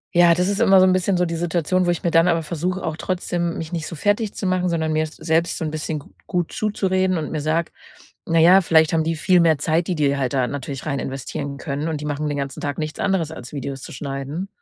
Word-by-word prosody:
ja, 170 -1 +6
das 180 +1 +1
ist 200 0 -1
immer 195 -1 +6
so 185 - +6
'n 185 - +4
bisschen 185 0 +1
so 180 - +2
die 165 0 -3
Situation, 175 +2 0
wo - - +2
ich 175 - -1
mir 170 - +1
dann 165 +2 +5
aber 165 -2 +2
versuche, 175 +4 -3
auch 160 -1 -3
trotzdem 175 -2 -2
mich 160 0 -6
nicht 165 -2 -3
so 165 - -7
fertig 205 +4 0
zu 195 - -4
machen, 185 -1 +1
sondern 160 -2 0
mir 155 - +2
s 155 - -11
selbst 160 +1 0
so 160 - -3
'n 155 - -3
bisschen 155 0 -3
gu - - -16 0.2
gut 175 -2 -1
zuzureden 190 -3 0
und 155 - -4
mir 155 -2 -2
sage: 160 +2 0 0.6
„Na 165 -1 +2
ja, 180 +4 +7
vielleicht 160 -2 +3
haben 160 -1 +2
die 165 0 -1
viel 180 +3 +3
mehr 160 -3 +4
Zeit, 160 +4 0
die 180 - -1
die 140 -2 +2
halt 135 -1 -1
da 130 -2 +2
natürlich 140 -1 -5
rein 140 -3 -1
investieren 140 +1 -5
können. 145 +3 -3
Und 155 -2 -2
die - - -5
machen 150 +1 -2
den 145 - -2
ganzen 140 -1 -4
Tag 145 -1 -3
nichts 155 -1 -4
anderes, 175 -5 0
als 125 -3 -9
Videos 135 -1 -5
zu - - -9
schneiden.“ 140 +6 -5
165 Hz, 265 wpm, -22 LUFS, 150-180 Hz, 0.6 s, ja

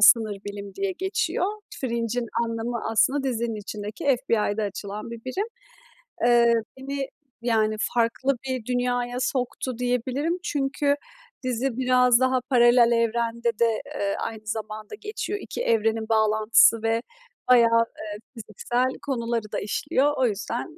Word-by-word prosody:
"sınır 215 -1 +6
bilim" 200 -1 -7
diye 395 -1 -1
geçiyor. 380 0 -1 0.3
Fringe'in 235 -1 -1 0.2
anlamı, 230 +1 -3
aslında, 260 +6 +3
dizinin 235 -4 -2
içindeki 210 +1 -6
FBI'da 230 -5 +1
açılan 205 +2 -5
bir 235 -1 -9
birim. 375 +12 -2 0.8
Eee, 235 -1 +5 0.2
beni, 275 0 -4 0.3
yani, 220 -2 +2
farklı 245 +3 +1
bir 255 -4 -3
dünyaya 245 0 -1
soktu 255 -1 -2
diyebilirim 250 +7 0
çünkü 285 -1 0 0.5
dizi 255 0 -1
biraz 250 -1 +4
daha 260 0 +2
paralel 240 -2 +6
evrende 235 0 0
de, 230 -2 +2
eee, 200 0 -1
aynı 220 -1 -5
zamanda 215 - -5
geçiyor, 420 -1 -4
2 475 - -6
evrenin 225 - +1
bağlantısı 220 +1 +4
ve 225 0 +1 0.5
bayağı, 230 -2 +6
eee, 210 -1 -6 0.2
fiziksel 240 +3 -1
konuları 235 -5 -2
da - - -1
işliyor, 265 +7 +1
o 260 - +3
yüzden, 235 - -4
235 Hz, 125 wpm, -25 LUFS, 220-255 Hz, 0.8 s, sınır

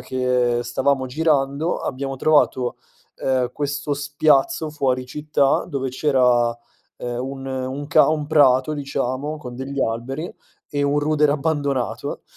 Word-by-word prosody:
che 125 -2 0
stavamo 130 +2 0
girando 145 +2 0
abbiamo 135 0 -4
trovato, 130 -3 +2 0.4
ehm, 130 -2 0
questo 145 0 -2
spiazzo 145 +2 +1
fuori 130 -4 0
città 150 0 +1
dove 135 -4 -2
c'era, 125 -4 +3 0.5
ehm, 120 0 -4
un 135 0 -6
un 130 +2 -4
ca - - +5
un 155 -1 0
prato, 145 -2 +4
diciamo, 140 0 -3
con 125 -5 -9
degli 135 +1 -5
alberi 130 +8 -3 0.4
e 145 -1 -1
un 145 +1 +2
rudere 150 0 +2
abbandonato, 140 -4 -2
140 Hz, 125 wpm, -22 LUFS, 130-145 Hz, 0.5 s, ca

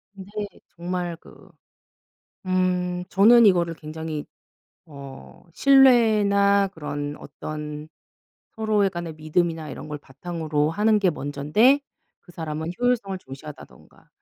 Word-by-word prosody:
근데 190 0 -11 0.5
정말 175 0 -3
그 - - -18 1.0
음 180 -1 0
저는 225 +4 +6
이거를 175 -3 +3
굉장히 155 -1 -6 0.6
어 140 -3 -12
신뢰나 210 - +4
그런 145 -5 -5
어떤 150 0 -7 0.7
서로의 215 -3 +2
간의 175 -3 -6
믿음이나 160 +1 -1
이런 - - -8
걸 150 - -5
바탕으로 150 +1 -3
하는 210 +4 +2
게 190 -3 +2
먼전데 150 - +2 0.4
그 175 - -17
사람은 160 0 -5
효율성을 230 -6 0
중시한다든가 140 -1 -13
175 Hz, 245 characters per minute, -24 LUFS, 155-200 Hz, 1.0 s, 저는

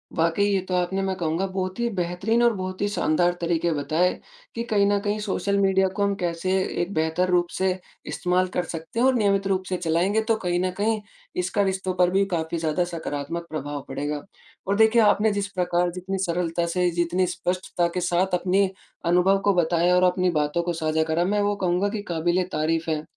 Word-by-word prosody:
वाक़ई, 165 +4 +2
ये 200 -2 +2
तो 185 - -3
आपने 180 +2 0
मैं 190 -1 -1
कहूँगा 165 +3 -1
बहुत 185 +1 -4
ही 235 0 +1
बेहतरीन 185 +7 0
और 235 - +4
बहुत 185 0 -5
ही 205 - +2
शानदार 175 -3 +1
तरीके 170 0 +1
बताए, 155 +5 +1 0.4
कि 230 - -2
कहीं 210 -4 +2
न 205 - +2
कहीं 205 +1 -1
सोशल 200 -1 -1
मीडिया 190 -1 +3
को 205 - 0
हम 200 0 +2
कैसे 175 -1 -2 0.3
एक 180 +3 -3
बेहतर 160 +3 0
रूप 175 -1 +3
से 190 0 +2 0.3
इस्तेमाल 180 +1 0
कर 180 - 0
सकते 165 +7 -6
हैं 255 - +4
और 265 - +5
नियमित 200 -3 +2
रूप 190 -1 0
से 185 - -1
चलाएँगे 180 +6 +1
तो 225 - +3
कहीं 175 0 +1
न 185 - 0
कहीं 215 +1 0 0.4
इसका 190 +3 0
रिश्तों 190 -1 -1
पर 180 0 +4
भी 195 +1 +3
काफ़ी 165 0 -1
ज़्यादा 160 +2 0
सकारात्मक 165 +1 -4
प्रभाव 145 -2 -4
पड़ेगा। 145 +2 -3 0.5
और 200 - +2
देखिए, 220 +1 +5
आपने 210 0 +4
जिस 200 0 -1
प्रकार 180 -2 0
जितनी 185 +2 -4
सरलता 170 -1 -1
से, 180 +1 +1
जितनी 175 +2 +1
स्पष्टता 180 0 -1
के 180 - -1
साथ 180 +1 +1
अपनी 190 +2 +2 0.4
अनुभव 180 +3 +4
को 200 - +4
बताया 175 +1 +3
और 180 - +3
अपनी 180 0 +3
बातों 150 +2 0
को 175 0 -1
साझा 160 -1 0
करा, 160 +2 0
मैं 205 +2 +1
वो 205 0 +1
कहूँगा 185 +1 0
कि 205 0 -4
क़ाबिल-ए-तारीफ़ 165 -1 0
है। 155 -1 -1
180 Hz, 200 wpm, -24 LUFS, 170-195 Hz, 0.5 s, और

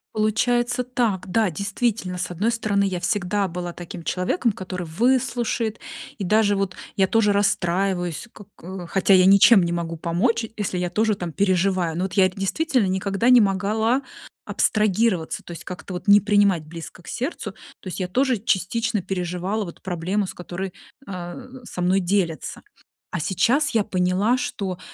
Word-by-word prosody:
Получается 240 +3 +1
так, 235 -7 -1
да. 220 -4 +2
Действительно, 200 +1 -2
с 180 - -2
одной 195 +7 0
стороны, 210 -3 0
я 185 -3 -1
всегда 195 +1 0
была 175 0 -5
таким 175 -1 -8
человеком, 205 - 0
который 185 -2 -6
выслушает, 230 +3 0 0.4
и 200 - -2
даже 205 +1 +3
вот 195 -2 -2 0.2
я 190 -1 +3
тоже 210 0 +3
расстраиваюсь, 185 -1 0
ко 205 - -13
кэ 180 +1 -8
хотя 195 +1 +4
я 185 - +6
ничем 195 +1 +7
не 170 - -1
могу 170 -1 -3
помочь, 225 +8 0
если 195 -3 -2
я 180 -1 -2
тоже 215 +2 +2
там 175 -3 -5
переживаю. 185 -3 +1
Но 180 - 0
вот 190 - -3
я 190 -2 +5
это 190 +1 -10
действительно 255 - +1
никогда 195 +4 0
не 245 - +8
могла 215 +6 +1 0.4
абстрагироваться, 210 -4 +1
то - - -11
есть 170 - -8
как-то 180 0 -8
вот 180 +2 -6
не 205 0 +7
принимать 205 -5 +3
близко 165 +2 -9
к - - -18
сердцу. 240 - -4 0.3
То - - -12
есть 185 - -4
я 185 - -1
тоже 255 +5 +1
частично 215 +2 0
переживала 180 +3 -2
вот 170 - -10
проблему, 185 +2 -1
с - - -6
которой, 180 +1 -6 0.3
а, 175 -2 -6 0.3
со 180 -6 -6
мной 185 +2 +3
делятся. 175 -4 -1 0.5
А 170 - -2
сейчас 230 - +2
я 220 -3 +2
поняла, 185 +7 +1
что 190 -7 -4
195 Hz, 170 wpm, -23 LUFS, 180-220 Hz, 0.5 s, не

